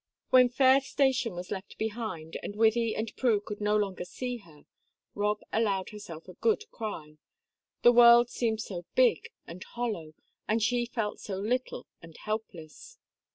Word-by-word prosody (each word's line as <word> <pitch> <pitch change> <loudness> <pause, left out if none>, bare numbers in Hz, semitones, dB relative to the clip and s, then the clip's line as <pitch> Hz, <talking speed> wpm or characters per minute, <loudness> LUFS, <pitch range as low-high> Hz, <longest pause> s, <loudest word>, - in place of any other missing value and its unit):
When 255 -1 +7
Fayre 260 +2 +5
station 265 -4 +1
was 180 +1 -7
left 190 +1 -6
behind, 215 -8 -4
and 205 - -6
Wythie 225 +1 +2
and 220 +1 -4
Prue 235 -5 +2
could 205 0 -8
no 210 +1 +2
longer 195 -4 -2
see 250 +7 -5
her, 165 -9 -19 0.5
Rob 210 +1 -1
allowed 200 -4 0
herself 175 -6 -10
a 185 - -10
good 440 - +1
cry 155 -9 -7 0.6
the 240 - +8
world 240 0 +7
seemed 225 -2 -1
so 175 -5 -6
big 245 -10 +3 0.2
and 180 +3 -9
hollow, 210 -11 -5 0.3
and 220 +2 +1
she 240 +1 +1
felt 220 -3 -3
so 195 -2 -5
little 245 +6 -2 0.2
and 165 -1 -13
helpless! 215 - -7
215 Hz, 155 wpm, -29 LUFS, 190-240 Hz, 0.6 s, the